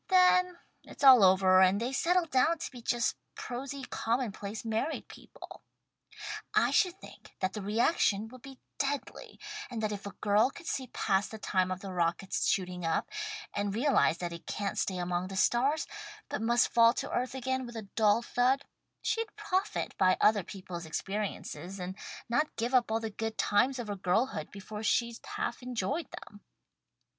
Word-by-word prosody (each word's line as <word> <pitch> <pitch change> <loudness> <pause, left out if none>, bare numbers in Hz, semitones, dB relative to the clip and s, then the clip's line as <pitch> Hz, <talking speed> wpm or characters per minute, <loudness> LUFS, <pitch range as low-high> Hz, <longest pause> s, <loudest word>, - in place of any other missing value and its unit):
Then 365 -1 +4 0.3
it's - - -11
all 260 -5 +9
over 185 0 +6
and 190 +2 +5
they 245 +4 -2
settle 350 +5 +2
down 320 +3 +2
to 325 - -6
be 250 -3 -10
just 235 -1 0 0.2
prosy 270 +2 -5
common 235 -1 -1
place 205 +3 -7
married 225 +8 -2
people. - - -12 0.9
I - - +4
should 370 -2 +2
think - - -14
that 185 0 -1
the 210 - -4
reaction 215 - +2
would 255 +1 -13
be 270 0 -11 0.2
deadly, 280 0 -3 0.3
and 240 -3 -5
that 215 - 0
if 205 -1 -5
a 200 - -7
girl 210 +4 +3
could 335 - -12
see 260 -5 -2
past 195 -3 0
the 220 - -7
time 185 -3 0
of 185 0 -4
the 195 -2 -6
rocket's 175 +2 0
shooting 180 -2 0
up, 165 - -1 0.4
and 205 0 -1
realize 250 - +3
that 175 -1 -4
it 170 - -10
can't 200 -1 -2
stay 185 - -1
among 175 0 -1
the 195 - -7
stars, 265 +10 +2 0.4
but - - -3
must 235 +2 +2
fall 230 0 +6
to - - -4
earth 250 +1 -1
again 260 0 -2
with 235 - -10
a 225 - -5
dull 220 +1 +4
thud, 255 +4 +1 0.4
she'd 450 -1 -1
profit 415 -1 -2
by 185 -1 +4
other 210 -1 +4
people's 180 -4 -8
experiences, 195 +1 -4
and 180 +1 -5 0.3
not 295 +6 0
give 235 +3 -2
up 250 -3 +4
all 225 - +2
the 225 -1 -4
good 220 +1 -4
times 250 +6 +2
of 240 -3 -5
her 205 - -3
girlhood 200 +7 0
before 210 +1 -8
she'd 235 +1 +1 0.2
half 235 - -3
enjoyed 250 - -2
them." 205 0 -11
225 Hz, 180 wpm, -31 LUFS, 195-260 Hz, 0.9 s, all